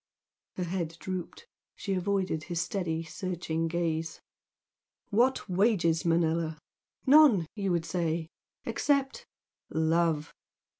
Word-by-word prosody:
Her 180 Hz, -, -2 dB
head 170 Hz, -2 st, -3 dB
drooped, 185 Hz, -, -5 dB, 0.3 s
she 195 Hz, -, -3 dB
avoided 190 Hz, -4 st, -1 dB
his 175 Hz, -2 st, -3 dB
steady, 165 Hz, -3 st, -2 dB
searching 165 Hz, -1 st, -3 dB
gaze. 165 Hz, -1 st, -2 dB, 0.9 s
"What 245 Hz, +5 st, +2 dB
wages, 180 Hz, -4 st, +2 dB
Manella? 165 Hz, -1 st, +1 dB, 0.5 s
None, 270 Hz, -, +7 dB
you 195 Hz, -3 st, -1 dB
would 170 Hz, -1 st, 0 dB
say, 165 Hz, -1 st, -1 dB, 0.4 s
except 280 Hz, -2 st, 0 dB, 0.4 s
love! 160 Hz, -1 st, +1 dB
170 Hz, 100 wpm, -29 LUFS, 165-195 Hz, 0.9 s, None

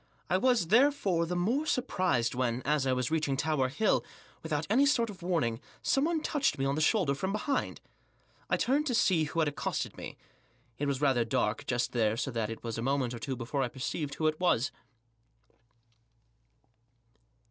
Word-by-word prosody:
I 185 Hz, -, +3 dB
was, 245 Hz, -8 st, +2 dB
therefore, 215 Hz, -8 st, +3 dB
the 180 Hz, -, -2 dB
more 235 Hz, -, 0 dB
surprised 185 Hz, -, 0 dB
when, 125 Hz, -1 st, -1 dB
as 145 Hz, -1 st, +1 dB
I -, -, +2 dB
was 125 Hz, +2 st, -1 dB
reaching 150 Hz, -4 st, 0 dB
Tower 145 Hz, -3 st, +1 dB
Hill, 215 Hz, +10 st, +1 dB, 0.4 s
without 155 Hz, -1 st, -2 dB
any 265 Hz, +7 st, +4 dB
sort 235 Hz, -6 st, +2 dB
of 195 Hz, -2 st, -14 dB
warning, 160 Hz, -11 st, 0 dB, 0.2 s
someone 315 Hz, +4 st, +1 dB
touched 280 Hz, -, 0 dB
me 135 Hz, -, -1 dB
on 135 Hz, -, +1 dB
the 155 Hz, -, -1 dB
shoulder 170 Hz, -4 st, +2 dB
from 190 Hz, +8 st, -2 dB
behind. 215 Hz, +7 st, -2 dB, 0.7 s
I -, -, +2 dB
turned 290 Hz, +4 st, +1 dB
to 250 Hz, -, 0 dB
see 175 Hz, -8 st, +3 dB
who 150 Hz, -, -7 dB
had 155 Hz, -, +2 dB
accosted 145 Hz, -, -3 dB
me. -, -, -8 dB, 0.6 s
It 145 Hz, -, -1 dB
was 140 Hz, -1 st, -1 dB
rather 135 Hz, -5 st, +3 dB
dark 115 Hz, -2 st, -1 dB
just 120 Hz, -1 st, 0 dB
there, 110 Hz, -2 st, +1 dB
so 135 Hz, +2 st, -2 dB
that 115 Hz, -3 st, -2 dB
it 115 Hz, -, -7 dB
was 115 Hz, -1 st, -4 dB
a -, -, -2 dB
moment 130 Hz, -1 st, 0 dB
or 120 Hz, -, -6 dB
two 130 Hz, +4 st, -3 dB
before 125 Hz, +3 st, -3 dB
I 130 Hz, -, +1 dB
perceived 140 Hz, +3 st, -4 dB
who 155 Hz, -, -2 dB
it 155 Hz, 0 st, +1 dB
was. 145 Hz, -7 st, +2 dB
150 Hz, 185 wpm, -30 LUFS, 130-195 Hz, 0.7 s, any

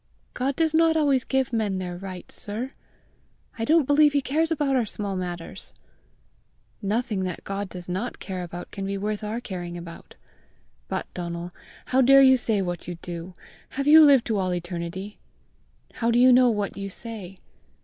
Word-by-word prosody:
"God 265 Hz, +2 st, -1 dB
does 320 Hz, 0 st, +1 dB
not 325 Hz, 0 st, +4 dB
always 280 Hz, -4 st, +3 dB
give 265 Hz, -2 st, 0 dB
men 210 Hz, -4 st, 0 dB
their 180 Hz, -1 st, -4 dB
rights, 185 Hz, 0 st, -8 dB
sir! 225 Hz, +6 st, -4 dB, 0.9 s
I 225 Hz, -, 0 dB
don't 320 Hz, +1 st, +4 dB
believe 290 Hz, +1 st, +5 dB
he 285 Hz, -, +3 dB
cares 315 Hz, +5 st, 0 dB
about 290 Hz, -4 st, +1 dB
our 250 Hz, -, +3 dB
small 205 Hz, -2 st, -4 dB
matters!" 175 Hz, -2 st, -6 dB, 1.1 s
"Nothing 215 Hz, +1 st, -1 dB
that 180 Hz, -2 st, -5 dB
God 195 Hz, 0 st, -4 dB
does 180 Hz, -1 st, -7 dB
not 190 Hz, +7 st, -3 dB
care 185 Hz, -2 st, -5 dB
about 175 Hz, 0 st, -7 dB
can 195 Hz, -, -6 dB
be 200 Hz, 0 st, -2 dB
worth 210 Hz, +2 st, -3 dB
our 215 Hz, +3 st, -3 dB
caring 175 Hz, -6 st, -6 dB
about. 170 Hz, -1 st, -11 dB, 0.7 s
But, -, -, -3 dB
Donal, 170 Hz, 0 st, -5 dB, 0.3 s
how 260 Hz, +1 st, +2 dB
dare 275 Hz, +2 st, +7 dB
you 260 Hz, 0 st, +7 dB
say 220 Hz, -5 st, 0 dB
what 175 Hz, -1 st, -5 dB
you 175 Hz, -, -4 dB
do? 175 Hz, +1 st, -7 dB, 0.3 s
Have 275 Hz, +1 st, -3 dB
you 310 Hz, +2 st, +9 dB
lived 275 Hz, -5 st, +6 dB
to 220 Hz, -3 st, 0 dB
all 185 Hz, -1 st, 0 dB
eternity? 175 Hz, +3 st, -5 dB, 0.7 s
How 230 Hz, -, -1 dB
do 235 Hz, -, +3 dB
you 250 Hz, +1 st, +7 dB
know 250 Hz, 0 st, +6 dB
what 205 Hz, -3 st, -2 dB
you 195 Hz, 0 st, -4 dB
say? 195 Hz, -3 st, -7 dB
210 Hz, 180 wpm, -25 LUFS, 180-260 Hz, 1.1 s, you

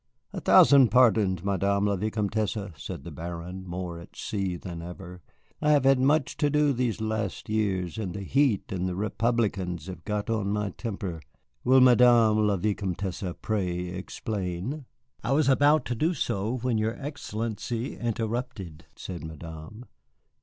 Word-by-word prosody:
"A -, -, -4 dB
thousand 135 Hz, -4 st, +7 dB
pardons, 105 Hz, -6 st, +4 dB
Madame 100 Hz, +1 st, +1 dB
la 100 Hz, -1 st, +2 dB
Vicomtesse," 105 Hz, +1 st, -1 dB, 0.2 s
said 70 Hz, -, -7 dB
the -, -, -8 dB
Baron, 85 Hz, +3 st, -7 dB
more 85 Hz, -1 st, -5 dB
at 85 Hz, -, -14 dB
sea 95 Hz, -4 st, -2 dB
than 85 Hz, -1 st, -7 dB
ever. 90 Hz, +1 st, -9 dB, 0.4 s
"I 150 Hz, -, +2 dB
have 145 Hz, -, +4 dB
had 135 Hz, -1 st, +5 dB
much 145 Hz, +2 st, +2 dB
to 145 Hz, -, +2 dB
do 150 Hz, -1 st, +3 dB
these 120 Hz, -3 st, -1 dB
last 110 Hz, -4 st, -3 dB
years, 100 Hz, -4 st, -1 dB
and 95 Hz, -4 st, -4 dB
the 100 Hz, -, -5 dB
heat 135 Hz, -1 st, +1 dB
and 95 Hz, -1 st, -1 dB
the 90 Hz, -, -3 dB
Republicans 105 Hz, -5 st, -1 dB
have 90 Hz, -3 st, -8 dB
got 105 Hz, +1 st, -2 dB
on 110 Hz, -3 st, -1 dB
my 105 Hz, -1 st, -1 dB
temper. 95 Hz, -6 st, -5 dB, 0.4 s
Will 130 Hz, +1 st, +6 dB
Madame 120 Hz, -4 st, +6 dB
la 100 Hz, -1 st, +2 dB
Vicomtesse 95 Hz, -2 st, -2 dB, 0.2 s
pray 90 Hz, -4 st, -1 dB
explain?" 95 Hz, -, -4 dB, 0.4 s
"I 120 Hz, +6 st, +1 dB
was 150 Hz, -1 st, +3 dB
about 145 Hz, +1 st, +4 dB
to 120 Hz, -, -2 dB
do 160 Hz, +9 st, 0 dB
so 105 Hz, +2 st, -1 dB
when 120 Hz, -2 st, 0 dB
your 110 Hz, +1 st, 0 dB
Excellency 115 Hz, -4 st, -4 dB
interrupted," 110 Hz, -, -4 dB
said 85 Hz, -4 st, -7 dB
Madame. 80 Hz, +7 st, -9 dB
105 Hz, 155 wpm, -27 LUFS, 90-120 Hz, 0.4 s, thousand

